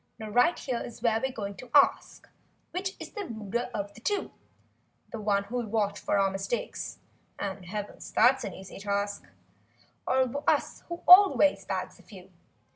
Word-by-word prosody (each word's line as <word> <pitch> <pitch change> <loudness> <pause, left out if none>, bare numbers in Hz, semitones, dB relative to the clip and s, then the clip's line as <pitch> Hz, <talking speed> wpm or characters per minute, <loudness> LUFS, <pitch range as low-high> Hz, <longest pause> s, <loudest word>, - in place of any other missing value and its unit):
Now 215 -1 -7
right 245 +10 +4
here's 240 -3 -5
where 225 -2 +2
we're 265 - -1
going 200 -4 -5
to 255 - -11
ask: 285 - +3 0.4
Which 380 +2 -3
is - - -8
the 415 -3 -5
ruder 220 +2 -3
of 205 -3 -4
the 225 - -15
two, 410 - -1 0.8
The 225 - -5
one 200 -1 +1
who'll 235 +3 -4
watch 205 -1 -1
for - - 0
our 195 -1 +2
mistakes 195 +4 -4 0.4
(And 195 -2 -5
heavens, 205 +2 -6
that's 260 +4 +4
an - - -5
easy 190 0 -10
task) 200 0 -2 0.8
Or 260 +2 +1
us, - - 0
who 340 0 -6
always 365 -5 +7
bags - - -4
a - - -15
few - - -14
225 Hz, 165 wpm, -28 LUFS, 200-260 Hz, 0.8 s, always